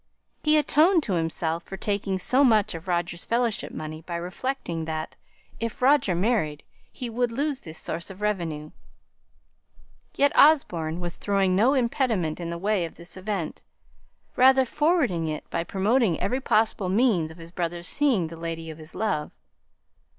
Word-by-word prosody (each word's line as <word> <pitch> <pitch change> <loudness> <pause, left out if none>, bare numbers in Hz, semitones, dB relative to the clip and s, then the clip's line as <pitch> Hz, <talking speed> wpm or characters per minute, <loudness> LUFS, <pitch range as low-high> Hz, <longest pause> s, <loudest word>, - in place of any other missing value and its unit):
He 305 0 +4
atoned 315 +3 +4
to 200 - -2
himself 165 0 -1
for 195 - -9
taking 200 -2 -1
so 255 +9 +3
much 220 -6 +4
of 165 +2 -8
Roger's 175 -1 -1
Fellowship 235 -2 -1
money 155 0 -6
by 170 +1 -6
reflecting 175 -1 -3
that, 155 -1 -4 0.4
if 230 0 -4
Roger 260 -8 +3
married, 175 -7 0 0.3
he 250 - -6
would 240 +1 -1
lose 280 +2 -1
this 160 -2 -8
source 170 - -5
of 190 0 -10
revenue; 170 -8 -2 1.4
yet 285 0 +3
Osborne 175 - +4
was 175 -1 -4
throwing 195 -2 +1
no 240 +8 +4
impediment 235 - 0
in 170 -1 -4
the 170 - -4
way 200 +1 0
of 165 - -6
this 170 +2 -6
event, 185 -4 -4 0.7
rather 265 +1 +6
forwarding 280 - +1
it 155 -1 -4
by - - -1
promoting 200 +1 +1
every 255 +2 -1
possible 215 -6 +1
means 195 -6 +2
of 160 - -12
his 165 0 -11
brother's 175 0 -3
seeing 265 - +2
the 165 +1 -7
lady 165 -1 -5
of 155 - -11
his 155 +1 -11
love. 200 -9 -1
190 Hz, 160 wpm, -25 LUFS, 165-245 Hz, 1.4 s, rather